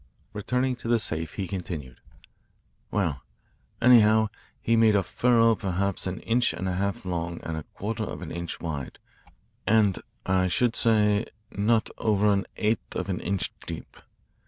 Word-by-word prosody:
Returning 125 +5 0
to 115 - -8
the 120 0 +4
safe, 80 -7 -3
he 95 -3 -3
continued: 85 -9 -6 0.9
"Well, 85 -10 -1 0.6
anyhow, 110 -3 +6 0.3
he 115 - +2
made 110 -2 +5
a 100 - +3
furrow 115 +3 +3
perhaps 100 -2 -1
an 95 - -4
inch 120 +1 +1
and 95 - -4
a - - 0
half 100 +1 -2
long 85 -1 -3
and 80 - -3
a 80 - -3
quarter 110 +2 -3
of - - -6
an 80 - -7
inch 85 0 -5
wide 75 -6 -5 0.7
and, 105 -2 +4 0.3
I 95 0 +2
should 115 +7 +1
say, 105 -1 +3 0.2
not 110 +2 +1
over 105 -1 +3
an 100 -1 -1
eighth 110 +1 -1
of - - -3
an 90 - -1
inch 100 -2 -2
deep. - - -7
100 Hz, 155 wpm, -27 LUFS, 90-110 Hz, 0.9 s, anyhow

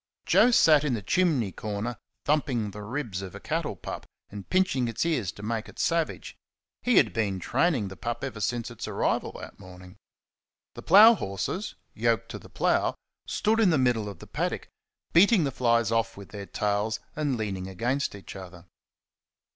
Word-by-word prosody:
Joe - - +5
sat 155 -11 +5
in 140 -5 0
the 105 - -5
chimney 145 - +1
corner 105 +5 -4 0.3
thumping 130 -8 0
the 105 - -8
ribs 110 -3 -4
of 95 -2 -8
a - - -7
cattle - - -2
pup, - - -7 0.2
and 100 -1 -9
pinching 185 -10 +2
its 115 +7 -2
ears 130 - 0
to 100 - -11
make 110 0 -3
it - - -15
savage. 165 -1 -1 0.5
He 250 -2 +3
had 110 -9 +4
been 100 -4 -1
training 130 - +1
the 95 - -9
pup 120 +4 -4
ever 125 -6 -4
since 115 +3 -2
its 120 - -7
arrival - - 0
that - - -10
morning. 90 +1 -13 0.8
The - - -9
plough 210 +6 +8
horses, 100 - -4 0.2
yoked - - 0
to - - -6
the - - -15
plough, - - +1 0.3
stood 220 +1 +1
in 215 -4 +5
the 160 - +3
middle 120 -5 +1
of 100 - -9
the - - -12
paddock, - - -3 0.4
beating 195 +2 +6
the 140 - -1
flies 115 -3 +2
off 115 -1 0
with 100 -1 -10
their 100 -2 -8
tails 105 +1 -1 0.2
and 145 -4 -1
leaning 95 -4 -3
against 120 +7 -2
each 100 - -10
other. 90 -2 -10
115 Hz, 180 wpm, -27 LUFS, 100-150 Hz, 0.8 s, plough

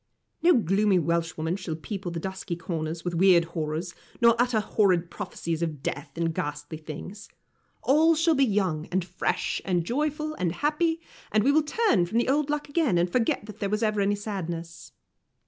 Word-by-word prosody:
No 350 +1 +6
gloomy 200 -1 +3
Welshwoman 165 +1 -1
shall 165 -5 -4
people 190 +3 -5
the 170 -1 -4
dusky 190 0 -4
corners 165 -1 -4
with 175 - -1
weird 175 -1 +5
horrors, 160 +1 -3 0.3
nor 235 -1 +6
utter 245 -3 +2
horrid 185 -5 +2
prophecies 165 -1 -4
of 155 -5 -3
death 145 +1 -3
and 165 -1 0
ghastly 150 +1 -4
things. 175 +6 -8 0.5
All 315 +4 +5
shall 330 +1 +3
be 275 -2 +3
young, 190 - 0
and 185 -1 0
fresh, 180 0 -1
and 175 -3 0
joyful, 300 - -1
and 175 - -1
happy, 320 - 0 0.3
and 215 -1 +3
we 275 - +4
will 310 +2 +4
turn 300 - +2
the 230 +8 0
old 290 +1 +2
luck 295 0 -1
again, 285 - +1
and 175 +1 +1
forget 230 -2 +1
that 215 -2 -10
there 200 - -1
was 210 +2 0
ever 215 -2 +1
any 200 +1 +2
sadness. 170 -5 -6
190 Hz, 180 wpm, -27 LUFS, 170-245 Hz, 0.5 s, No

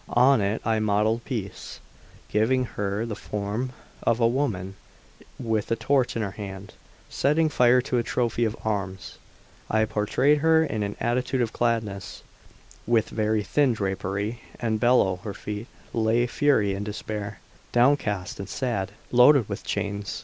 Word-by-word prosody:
On 125 -1 +6
it 100 +2 -1
I 110 -1 +2
modelled 110 +2 +1
Peace, 110 -7 -5 0.5
giving 125 +4 +2
her 105 -1 -2
the 115 -3 -4
form 105 +6 -3 0.3
of 115 0 +1
a 115 - +4
woman 115 -8 -1 0.6
with 110 -2 -1
a 115 - +2
torch 135 0 +1
in 115 - -1
her 100 - -3
hand, 100 -1 -8 0.3
setting 155 +3 +2
fire 125 -2 +4
to 125 -2 0
a - - 0
trophy 120 -1 0
of 110 -1 -1
arms; 100 -3 -3 0.5
I 110 0 +3
portrayed 125 +8 +2
her 160 +1 +4
in 110 -8 -3
an 100 0 -2
attitude 125 +2 0
of 120 -1 -1
gladness, 110 -5 -2 0.6
with 115 -2 +2
very 110 -1 0
thin 135 +5 +2
drapery, 100 +2 -3 0.2
and 110 -2 0
below 120 -6 +3
her 100 +2 -7
feet 105 +3 -6 0.3
lay 115 +1 +2
Fury 120 -6 +2
in 100 +1 -3
despair, 105 -1 -5 0.3
downcast 120 -7 +1
and 100 0 -6
sad, 115 -8 -2 0.2
and 125 - +1
loaded 130 -3 +7
with 100 - -5
chains. 100 -1 -3
110 Hz, 155 wpm, -25 LUFS, 100-125 Hz, 0.6 s, loaded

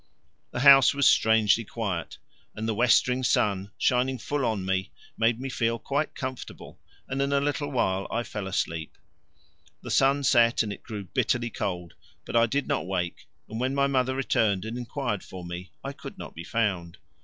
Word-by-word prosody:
The 125 - -4
house 135 -1 +8
was 140 -1 +4
strangely 110 0 +4
quiet, 100 -6 -4 0.4
and 110 +1 -4
the 110 - +1
westering 125 +2 +3
sun 100 -6 +1
shining 130 +1 +1
full 145 +4 -2
on 105 -5 -1
me 95 0 -1 0.3
made 115 +1 +2
me 135 - -4
feel 115 -2 0
quite 140 +6 -2
comfortable, 130 -1 -7 0.3
and 135 +1 -2
in 140 0 0
a 140 - +3
little 145 +1 -1
while 95 -8 0
I 120 +1 -1
fell 105 -4 -5
asleep. 80 -4 -3 0.9
The - - -6
sun 140 +1 +3
set 120 -4 +4
and 105 -2 -4
it - - -11
grew 105 -3 -6
bitterly 120 +6 -1
cold, 90 -5 -4 0.3
but - - -6
I 115 0 +5
did 140 +5 -1
not 145 -10 -1
wake, 90 -2 -3 0.2
and 110 - -6
when 130 +2 0
my 140 0 +3
mother 130 -1 +1
returned 110 -7 +1
and 110 +1 -5
inquired 120 -3 -3
for 90 -2 -9
me 90 +1 -7
I - - -4
could - - -10
not - - -8
be 85 +1 -8
found. 95 -6 -1
115 Hz, 185 wpm, -27 LUFS, 100-130 Hz, 0.9 s, house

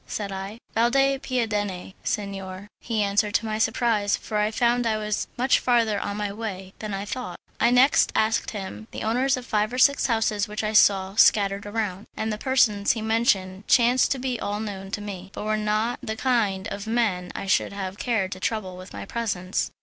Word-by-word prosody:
said 205 -2 -4
I. 195 +3 -6 0.2
"Valde 270 +4 +3
Piadene, 210 -8 -2
signor," 195 -1 -4
he 220 -3 -1
answered, 205 +1 +1
to - - +2
my 215 0 -2
surprise, 220 -2 +1
for 215 - -4
I 210 0 +2
found 240 +2 +1
I 220 -1 +1
was 210 -1 -2
much 255 +2 +3
farther 230 -4 +2
on 205 0 -4
my 205 -1 -2
way 195 -3 -6
that 215 -1 -5
I 195 +1 -3
thought. 250 +4 -5 0.2
I - - +4
next 250 +3 +5
asked 220 +1 +1
him 210 +1 -7
the - - -6
owners 255 +5 +1
of 250 - -7
five 215 -1 0
or 250 - -4
six 280 +2 +4
houses 220 -3 +1
which 210 +1 -4
I 215 0 -1
saw 195 -2 +4
scattered 200 -1 +4
around, 205 -2 -3
and 220 0 -1
the 210 - -5
persons 225 -7 +3
he 225 - -5
mentioned 210 -4 +1
chanced 245 +1 +4
to - - -6
be 250 -2 -2
all 205 -1 -2
known 195 -3 -5
to 205 - -4
me, 195 -2 -7
but - - -5
were 215 0 0
not 215 +3 0
the 220 - -4
kind 220 -6 0
of 200 +2 -6
men 210 -6 0
I - - -4
should 190 - +2
have 195 -1 -5
cared 215 -6 0
to 185 - -6
trouble 190 -3 -3
with 185 +1 -11
my - - -6
presence. 195 -5 -2
215 Hz, 205 wpm, -25 LUFS, 200-235 Hz, 0.2 s, next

